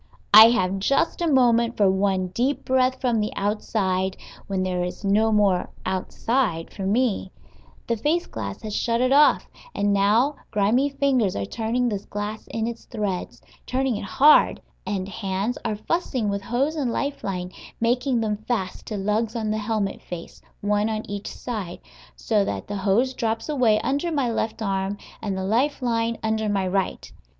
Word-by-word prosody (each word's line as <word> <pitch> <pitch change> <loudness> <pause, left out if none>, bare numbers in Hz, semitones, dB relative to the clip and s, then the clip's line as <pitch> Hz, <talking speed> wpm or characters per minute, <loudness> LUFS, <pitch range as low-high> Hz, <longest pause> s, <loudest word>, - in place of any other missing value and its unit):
I 215 +1 +12
have 195 -4 +1
just 275 - +1
a 340 - +1
moment 235 -3 +3
for 205 - +4
one 190 -1 0
deep 250 +9 -1
breath 260 0 +2
from 240 -3 +1
the 210 0 -1
outside, 195 -2 -1 0.3
when 190 -2 -1
there 180 -1 -1
is 180 +3 -5
no 215 +3 +3
more 200 -4 +2 0.2
"outside" 190 0 -1
for 190 -1 -4
me; 215 -3 0 0.5
the 235 - 0
face 305 +10 0
glass 100 -3 -6
has 215 -1 -4
shut 230 0 0
it 255 +1 +2
off, 295 +2 +5 0.3
and 205 0 +1
now 220 +9 +3
grimy 225 +7 +2
fingers 275 -7 +1
are 100 - -2
turning 235 - -1
this 205 -4 -3
glass 210 +1 -5
in 225 -1 -2
its 235 0 -6
threads, 190 - -4 0.2
turning 260 -1 0
it 205 - -4
hard, 290 +8 +5 0.3
and 195 -2 -2
hands 200 +2 -3
are 220 -2 -1
fussing 255 -2 -1
with 200 0 -2
hose 270 +9 -1
and 275 -6 -1
life 280 +4 -3
line, 180 -2 -3 0.3
making 245 +1 +1
them 210 -2 -1
fast 190 -7 -3
to 215 - -3
lugs 210 +3 -1
on 220 -2 -1
the 215 - -1
helmet 210 -2 -2
face, 175 -2 -9 0.2
one 205 +1 +1
on 215 0 -3
each 205 0 -5
side, 210 -8 -5 0.4
so 215 -3 +1
that - - -3
the 205 - -4
hose 210 +7 +2
drops 225 -2 -2
away 250 -8 +3
under 285 +7 -1
my 275 -6 0
left 225 0 -2
arm, 195 0 -1 0.2
and 195 -3 -3
the 190 - -3
life 250 +9 +1
line 230 -2 0
under 220 -1 0
my 195 -2 0
right. 190 +1 -2
215 Hz, 175 wpm, -24 LUFS, 195-245 Hz, 0.5 s, I